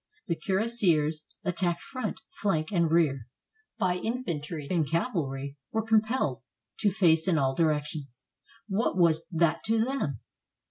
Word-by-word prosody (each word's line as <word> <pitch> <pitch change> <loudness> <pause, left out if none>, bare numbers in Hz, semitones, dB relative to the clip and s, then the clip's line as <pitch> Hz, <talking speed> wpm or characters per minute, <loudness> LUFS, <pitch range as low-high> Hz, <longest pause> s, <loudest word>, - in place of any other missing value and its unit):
The 170 - 0
cuirassiers, 170 -5 +1 0.2
attacked 175 -2 -1
front, 255 -1 -4 0.2
flank, 160 -6 +1
and 170 -4 +2
rear, 150 -7 +2 0.5
by 180 -1 +1
infantry 170 - -3
and 165 -5 +1
cavalry, 145 - -2
were 220 0 -1
compelled 220 - +2 0.4
to 205 - +3
face 175 -4 +3
in 175 -4 +3
all 135 -2 +2
directions. 150 -4 -1 0.4
What 205 0 0
was 165 -2 +3
that 165 -1 +2
to 225 0 +2
them? 205 - -2
170 Hz, 130 wpm, -28 LUFS, 150-205 Hz, 0.5 s, to